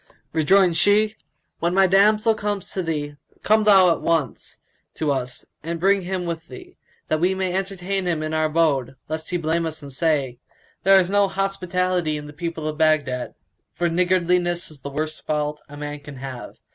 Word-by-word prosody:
Rejoined 175 +3 +4
she, 210 +1 +3 0.4
"When 170 +2 0
my 195 0 +6
damsel 210 +4 +4
comes 205 -3 -3
to 190 - -2
thee, 150 -3 -3 0.3
come 215 0 +3
thou 190 -4 +7
at - - -1
once 160 -7 -2 0.4
to 155 -2 0
us 130 -2 -3 0.2
and 165 +1 -4
bring 195 +2 +3
him 180 0 -3
with 165 -1 -5
thee, 365 -1 -12 0.3
that 155 - 0
we 180 +3 +2
may 190 -1 -1
entertain 195 0 -2
him 165 -3 -1
in 155 0 -3
our 155 0 +2
abode, 150 -5 +1
lest 155 0 -4
he 180 - 0
blame 165 0 0
us 160 -1 -7
and 140 -1 -8
say, 140 -5 0 0.4
'There 195 0 +6
is 185 0 0
no 200 0 +4
hospitality 185 -4 -1
in 150 - -7
the 150 - -10
people 165 0 -4
of 155 +1 -4
Baghdad'; 145 -5 +1 0.4
for 175 -1 0
niggardliness 175 -1 +1
is 145 -3 -14
the 140 - -6
worst 155 +2 -4
fault 150 0 -1
a 145 - -10
man 145 0 -5
can 145 -1 -11
have. 130 -2 -8
170 Hz, 185 wpm, -23 LUFS, 150-190 Hz, 0.4 s, thou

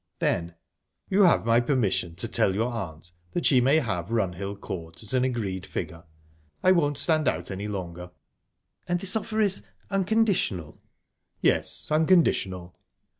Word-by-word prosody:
Then: 85 0 -1 0.6
"You 195 +2 +4
have 170 - +4
my 115 +1 +4
permission 115 - 0
to 90 - -3
tell 95 - +1
your 115 +4 0
aunt 85 -6 -6 0.2
that 175 - -1
she 130 -3 +5
may 135 +4 +4
have 95 - -1
Runhill 100 -3 -2
Court 85 -1 -7
at 110 - -5
an 130 -1 +3
agreed 105 -8 -2
figure. 85 -3 -6 0.6
I 185 - +6
won't 145 -6 +2
stand 155 +1 +2
out 85 +4 -1
any 100 +2 -4
longer." 90 -3 -6 0.8
"And 175 0 0
this 190 +2 +1
offer 220 0 -2
is...unconditional?" 195 - 0 0.6
"Yes, - - +1
unconditional." 155 - +2
115 Hz, 140 wpm, -26 LUFS, -, 0.8 s, I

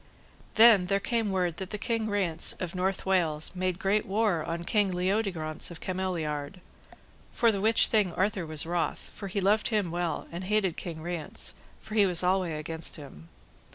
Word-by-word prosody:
Then 220 -5 +7
there 195 +1 +2
came 230 0 -1
word 180 -3 0
that 190 0 -5
the 210 - -4
King 225 +1 -1
Rience 185 -6 +1
of 180 -2 -5
North 190 +1 -1
Wales 170 -4 +1
made 185 -1 -1
great 200 +2 +1
war 200 -5 +1
on 170 +2 -4
King 205 +2 +2
Leodegrance 180 -4 -1
of 170 - -9
Cameliard, 180 -3 -3 0.7
for 230 -1 +3
the 200 -2 -2
which 220 +2 +4
thing 210 -5 +2
Arthur 190 -3 0
was 155 -1 -1
wroth, 170 0 -2
for 200 - -7
he 200 +2 -2
loved 205 +3 +2
him 210 -6 0
well, 175 -1 -2
and 175 +2 -5
hated 195 -4 +1
King 160 -3 -6
Rience, 175 -2 -3 0.3
for 215 - -10
he 205 -2 +5
was 180 -1 0
alway 180 -2 +1
against 160 +1 -1
him. 110 - -12
185 Hz, 180 wpm, -28 LUFS, 170-205 Hz, 0.7 s, Then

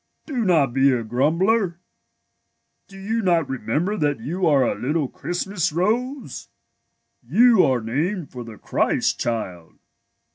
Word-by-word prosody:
Do 260 -7 -2
not 155 - +2
be 135 +1 +4
a 120 -3 0
grumbler. 170 - +1 1.1
Do 195 - -14
you 220 +4 -2
not 170 -6 +2
remember 150 - -2
that 145 -4 0
you 175 +4 -2
are 140 -4 +4
a - - +1
little 150 +2 -1
Christmas 180 +4 -3
rose? 225 - -2 0.7
You 215 - +4
are 130 -3 +2
named 155 - -2
for 125 -2 -7
the 115 -2 -11
Christ - - 0
Child. 95 -8 -4
165 Hz, 135 wpm, -22 LUFS, 130-195 Hz, 1.1 s, be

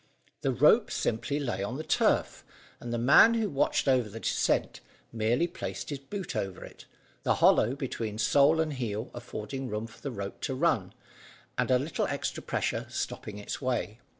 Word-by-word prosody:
The - - +1
rope - - +5
lay - - -6
simply 120 -3 -1
on 120 +6 -3
the 155 - -4
turf, 155 - +1 0.4
and 120 - -6
the 120 - 0
man 140 - +7
who 225 -2 +1
watched 140 -3 +1
over 125 -5 +3
the 110 +3 -8
descent, - - 0 0.3
merely 115 +7 +1
placed 175 -2 -6
his 140 - -3
boot 180 +2 -6
over 95 -4 -3
it, - - -14 0.4
the - - +2
hollow 120 +5 +4
between 115 -6 -4
sole 140 +8 +4
and 160 -2 0
heel 115 -3 -4
affording 125 +2 -6
room 105 +1 -3
for 115 - -14
the 140 - -3
rope 100 -5 -6
to 135 - -2
run, 130 - +1 0.6
and - - 0
a 130 - +5
little 145 +5 -1
extra - - -3
pressure - - -2
stopping 105 -1 -4
its 105 - -6
way. 125 -4 -2
125 Hz, 180 wpm, -29 LUFS, 110-140 Hz, 0.6 s, man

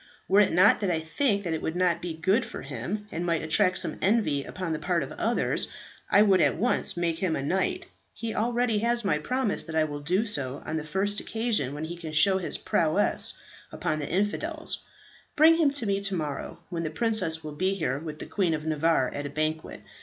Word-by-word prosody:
Were 195 +2 +5
it 205 - +4
not 185 +5 +5
that 200 - 0
I 165 -2 +1
think 200 - 0
that 170 -3 -2
it 160 - -3
would 160 - -3
not 175 -2 +1
be 170 -2 -4
good 195 +9 +2
for - - -8
him, 140 - -5
and 165 - -3
might 165 -3 0
attract 185 +4 +2
some - - -2
envy 190 -9 +2
upon 180 0 -4
the 155 - -3
part 175 -3 0
of 135 - -7
others, 230 +2 0 0.4
I 205 - +6
would 195 -3 +4
at - - +3
once 240 -4 0
make 170 -1 -1
him 180 -3 0
a 135 - -3
knight. 190 - -1 0.3
He 230 -1 -5
already 235 -1 +1
has 235 0 0
my 150 -6 +2
promise 250 +5 -1
that 160 - -6
I 160 - +4
will 145 -1 -4
do 180 +9 0
so 140 - -1
on 160 - -2
the 155 - -3
first 195 +6 -1
occasion 220 - -1
when 150 +2 -4
he 170 +2 -6
can 165 -2 -8
show 190 +5 +5
his 180 - -3
prowess 165 +5 +2 0.4
upon 155 - -2
the 145 - -4
infidels. 305 - -1 0.6
Bring 320 +2 +6
him 320 -4 +4
to 275 -4 -1
me 200 -1 0
to 195 -1 0
morrow, 150 -4 -4
when 170 -2 -3
the 160 - -2
princess 185 -4 +1
will 155 - -6
be 185 +6 0
here 140 -7 -1
with 155 -1 -7
the - - -7
Queen 180 -5 0
of 155 0 -6
Navarre 160 -3 +2
at 145 0 -5
a - - -7
banquet. 155 +2 -3
180 Hz, 225 wpm, -27 LUFS, 155-210 Hz, 0.6 s, I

